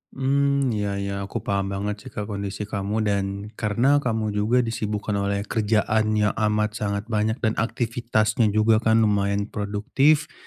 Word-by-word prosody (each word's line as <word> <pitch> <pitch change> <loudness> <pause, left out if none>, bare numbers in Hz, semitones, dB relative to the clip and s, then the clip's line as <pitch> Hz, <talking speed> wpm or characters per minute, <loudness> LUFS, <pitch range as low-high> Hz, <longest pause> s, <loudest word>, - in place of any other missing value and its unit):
Mmm, 140 0 +1
iya 105 -2 -1
iya, 100 0 -3
aku - - -5
paham 100 -1 -1
banget 100 +2 -3
sih, - - -7
Kak, 105 0 -4
kondisi 100 0 -4
kamu 105 +1 -2
dan 100 -2 +1 0.3
karena 120 +7 +3
kamu 110 -5 -1
juga 110 +5 +2
disibukkan 105 -2 -3
oleh 100 0 -1
kerjaan 110 0 +1
yang 105 0 +2 0.2
amat 105 +2 0
sangat 100 -1 -2
banyak 110 0 +1
dan 110 -1 +1
aktivitasnya 115 -1 0
juga 110 0 +4
kan 110 0 +3
lumayan 100 -1 0
produktif. 125 +9 +1
105 Hz, 155 wpm, -24 LUFS, 100-115 Hz, 0.3 s, juga